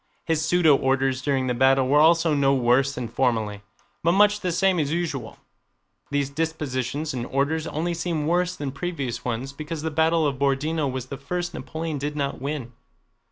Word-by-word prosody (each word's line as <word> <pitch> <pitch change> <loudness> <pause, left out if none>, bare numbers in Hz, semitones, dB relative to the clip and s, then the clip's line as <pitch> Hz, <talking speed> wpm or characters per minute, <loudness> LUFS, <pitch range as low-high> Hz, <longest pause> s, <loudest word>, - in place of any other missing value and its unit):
His 160 -2 0
pseudo 160 -3 +4
orders 135 -1 +1
during 135 -2 0
the 125 - 0
battle 130 +1 +3
were 145 +3 +4
also 165 0 +4
no 140 -1 +3
worse 130 +2 +2
than 125 -1 -4
formerly, 110 -4 -1 0.4
but 170 +2 +3
much 210 +1 +4
the 180 -3 -2
same 185 +1 +2
as 145 -2 0
usual. 155 -8 -3 0.7
These 140 -1 -1
dispositions 145 -2 -2
and 125 -2 -4
orders 150 +4 0
only 170 +3 -2
seem 165 -2 -2
worse 175 +2 +1
than 140 -2 -4
previous 140 -5 -4
ones 125 +3 -3
because 155 +2 -6
the 160 - -2
battle 160 +1 +2
of 135 -3 -1
Borodinó 140 +1 0
was 130 -1 -4
the 135 +1 -7
first 175 +6 -4
Napoleon 160 -2 -4
did 145 +2 -3
not 140 -3 -2
win. 135 -3 -4
145 Hz, 180 wpm, -24 LUFS, 135-160 Hz, 0.7 s, pseudo